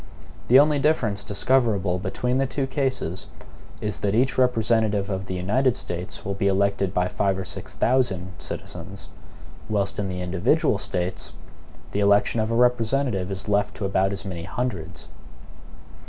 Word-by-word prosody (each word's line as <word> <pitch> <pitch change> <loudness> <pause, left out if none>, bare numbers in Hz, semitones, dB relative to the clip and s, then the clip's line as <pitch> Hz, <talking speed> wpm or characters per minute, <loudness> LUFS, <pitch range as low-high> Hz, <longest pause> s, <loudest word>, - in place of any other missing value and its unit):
The 125 - +7
only 145 +1 +5
difference 120 -9 +1
discoverable 105 -5 +1
between 125 +7 -1
the 135 - +1
two 135 +1 -2
cases 130 - -2 0.5
is, 105 -1 -2
that 100 0 0
each 130 +4 +2
representative 110 -5 +2
of 95 0 -3
the 95 - -3
United 115 +8 +1
States 90 +1 -6
will 100 - -1
be 100 0 0
elected 100 -1 +1
by 90 -2 +1
five 95 0 0
or 95 - -4
six - - -7
thousand 115 -8 +1
citizens; - - -8 0.6
whilst 100 -2 0
in 100 -1 -1
the 90 -1 -4
individual 100 - +1
States, 90 -1 -3 0.6
the 100 - -2
election 100 +3 +3
of 110 0 0
a 115 - 0
representative 120 -4 +2
is 95 +1 -5
left 105 0 +1
to 100 - -3
about 95 0 +1
as 100 +1 -5
many 90 -4 -5
hundreds. 90 -4 -4
100 Hz, 155 wpm, -24 LUFS, 95-125 Hz, 0.6 s, The